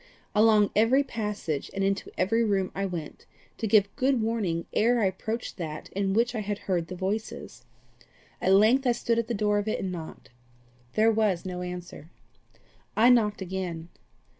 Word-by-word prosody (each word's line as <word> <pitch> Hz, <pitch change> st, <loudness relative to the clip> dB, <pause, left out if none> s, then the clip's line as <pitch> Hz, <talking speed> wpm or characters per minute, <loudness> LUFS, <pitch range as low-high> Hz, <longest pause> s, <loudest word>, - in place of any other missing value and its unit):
Along 215 Hz, -1 st, +4 dB
every 235 Hz, +6 st, +4 dB
passage 210 Hz, -, -4 dB
and 195 Hz, -, 0 dB
into 195 Hz, 0 st, -1 dB
every 225 Hz, +5 st, +2 dB
room 195 Hz, -4 st, 0 dB
I 195 Hz, 0 st, -2 dB
went, 170 Hz, -5 st, -7 dB, 0.3 s
to 225 Hz, -, -1 dB
give 200 Hz, -1 st, +3 dB
good 265 Hz, -2 st, +2 dB
warning 215 Hz, -7 st, -1 dB
ere 240 Hz, +2 st, +3 dB
I 215 Hz, -, +2 dB
approached 220 Hz, +5 st, -3 dB
that 155 Hz, -4 st, -6 dB
in 195 Hz, 0 st, -1 dB
which 235 Hz, +2 st, +2 dB
I 225 Hz, -, -2 dB
had 205 Hz, -1 st, -3 dB
heard 175 Hz, -5 st, -2 dB
the 185 Hz, -, -6 dB
voices. 200 Hz, +4 st, -4 dB, 0.8 s
At 190 Hz, -, +3 dB
length 230 Hz, +7 st, +5 dB
I 245 Hz, -, +4 dB
stood 235 Hz, -1 st, 0 dB
at 230 Hz, -, -2 dB
the 235 Hz, -, -2 dB
door 210 Hz, 0 st, +1 dB
of 205 Hz, -, -4 dB
it 215 Hz, -, -1 dB
and 190 Hz, -, -3 dB
knocked. 165 Hz, -8 st, -8 dB, 0.6 s
There 220 Hz, +1 st, +4 dB
was 210 Hz, -6 st, +1 dB
no 180 Hz, -1 st, -4 dB
answer. 180 Hz, -3 st, -7 dB, 0.9 s
I 235 Hz, +3 st, +6 dB
knocked 210 Hz, -5 st, +2 dB
again. 175 Hz, -3 st, -5 dB
205 Hz, 175 wpm, -27 LUFS, 185-225 Hz, 0.9 s, I